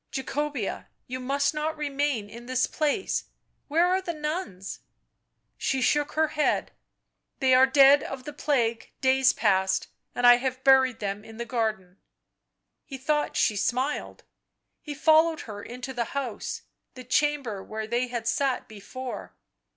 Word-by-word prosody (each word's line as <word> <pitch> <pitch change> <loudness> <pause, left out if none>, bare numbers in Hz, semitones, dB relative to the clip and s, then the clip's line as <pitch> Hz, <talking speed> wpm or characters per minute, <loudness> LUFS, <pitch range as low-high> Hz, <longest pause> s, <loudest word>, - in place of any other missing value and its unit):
" - - -45
Jacobea 280 -4 -3
— - - -48
you 255 - -3
must 280 +3 0
not 310 +1 -2
remain 285 -6 -1
in 235 +3 -11
this 255 0 +1
place! 310 +6 -1 0.2
— - - -47
where 330 +4 +3
are 370 +1 +2
the 345 -3 -4
nuns?" 300 - -4 0.8
She 265 - 0
shook 290 +3 +1
her 315 0 +2
head. 300 0 0 0.3
" - - -53
They 260 -1 +4
are 260 +1 +7
dead 275 +1 +7
of 270 -1 -6
the 295 - -7
plague 240 -6 -1
days 260 0 +4
past, 190 -2 +1 0.3
and 245 - +1
I 245 0 +9
have 255 0 -3
buried 265 -3 +4
them 200 0 -3
in 225 0 -12
the 235 - -4
garden." 215 -6 -2 0.8
He 270 - -8
thought 295 +3 -1
she 215 - +2
smiled; 255 +8 -2 0.6
he 295 -2 -7
followed 315 +2 +4
her 205 -2 -8
into 250 +4 -7
the 240 -2 -1
house, 255 -6 -4 0.3
the 255 - -9
chamber 255 -6 0
where 220 0 -5
they 240 +3 -1
had 235 -2 -4
sat 265 +1 0
before. 245 +5 -8
260 Hz, 160 wpm, -26 LUFS, 230-295 Hz, 0.8 s, I